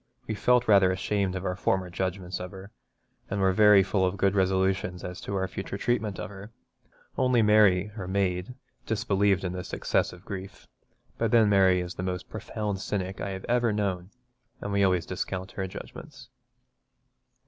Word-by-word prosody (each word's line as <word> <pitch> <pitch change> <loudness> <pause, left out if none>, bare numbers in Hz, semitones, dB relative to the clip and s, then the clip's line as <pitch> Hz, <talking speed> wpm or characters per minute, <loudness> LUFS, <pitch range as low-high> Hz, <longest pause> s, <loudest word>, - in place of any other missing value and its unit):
We 110 - -3
felt 125 +4 +2
rather 100 -3 +6
ashamed 95 0 -1
of 95 +1 -4
our 90 - -1
former 95 -2 0
judgments 95 0 -3
of 90 - -5
her, 95 +1 -11 0.6
and 100 - -2
were 95 -1 +3
very 105 -1 +7
full 95 0 0
of 95 +1 0
good 100 +1 +2
resolutions 95 -1 0
as 90 0 -6
to 100 - -4
our 95 -1 0
future 100 +1 -5
treatment 110 -3 -1
of - - -5
her. 100 +1 -10 0.7
Only 125 -3 +3
Mary, 105 -2 +4
our 95 -5 -6
maid, 95 +3 -1 0.3
disbelieved 100 -3 +1
in 90 -1 -2
this 90 0 -7
excessive 90 +1 -1
grief; 95 -1 -8 0.5
but - - +1
then 115 -3 +5
Mary 95 -2 +4
is 90 0 -5
the - - -6
most 90 0 -4
profound 105 -1 -4
cynic 95 -1 -3
I - - -3
have 95 -1 -6
ever 120 -1 +2
known, 95 -3 -2 0.5
and 100 - -5
we 100 0 +2
always 90 -3 +2
discount 95 +1 -4
her 95 -1 -4
judgments. 135 +8 -10
95 Hz, 175 wpm, -27 LUFS, 95-105 Hz, 0.7 s, very